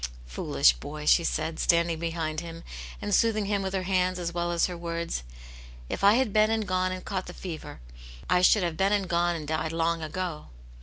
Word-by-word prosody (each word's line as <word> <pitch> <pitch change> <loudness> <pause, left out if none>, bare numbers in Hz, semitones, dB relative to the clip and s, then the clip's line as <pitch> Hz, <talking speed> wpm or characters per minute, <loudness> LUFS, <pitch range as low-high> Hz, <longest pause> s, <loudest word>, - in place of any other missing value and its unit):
"Foolish - - +3
boy!" 150 - -8
she 170 - +5
said, 160 0 -2
standing 170 -1 +2
behind 165 -2 -2
him 165 0 -8 0.4
and 205 - -2
soothing 215 0 +3
him 200 0 0
with 190 0 -3
her 190 - -1
hands 185 -1 +1
as 170 -1 -3
well 175 0 -1
as 170 -1 +2
her 180 - -4
words; 170 - -3 0.7
"if - - -4
I 200 +2 +7
had 245 -5 +1
been 215 0 +4
and 220 -2 0
gone 185 0 +1
and 185 0 -6
caught 190 -3 -3
the 175 - -7
fever, 165 - -7 0.5
I 180 - +3
should 190 +2 +5
have 170 -2 -2
been 195 +3 +2
and 200 -2 +1
gone 175 0 +1
and 155 -3 -6
died 155 0 -1
long 165 0 0
ago." 160 -1 -4
175 Hz, 210 wpm, -27 LUFS, 165-190 Hz, 0.7 s, I